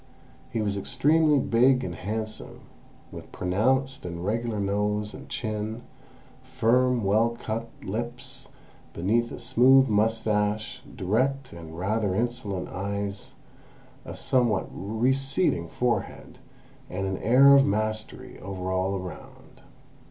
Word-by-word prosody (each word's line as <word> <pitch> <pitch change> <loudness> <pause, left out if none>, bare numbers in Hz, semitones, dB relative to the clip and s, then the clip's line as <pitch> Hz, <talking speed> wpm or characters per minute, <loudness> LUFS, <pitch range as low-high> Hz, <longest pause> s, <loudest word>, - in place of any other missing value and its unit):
He 115 - -1
was 100 -1 -1
extremely 150 +7 +3
big 130 +1 +3
and - - -4
handsome, 110 +2 -5 0.5
with - - -10
pronounced 130 +9 0
and 85 -1 -5
regular 115 +1 -1
nose 105 +1 -1
and - - -11
chin, 110 +1 -4 0.6
firm, 125 -1 +2
well 110 +4 +2
cut 115 +1 -4
lips 125 +5 -6 0.5
beneath 115 +7 0
a - - -6
smooth 130 +2 +5
moustache, 110 +2 0
direct 130 +8 0
and 80 -1 -10
rather 100 +1 0
insolent 115 -5 -2
eyes, 100 +1 -4 0.7
a - - -8
some 125 -2 +2
what 105 -3 -1
receding 130 - 0
forehead, 120 +6 -3 0.5
and 95 +1 -3
an 95 0 -2
air 135 +5 +6
of 140 0 +7
mastery 110 +1 -3
over 95 -1 -5
all 95 +1 0
around. 90 -4 -9
110 Hz, 115 wpm, -26 LUFS, 100-125 Hz, 0.7 s, of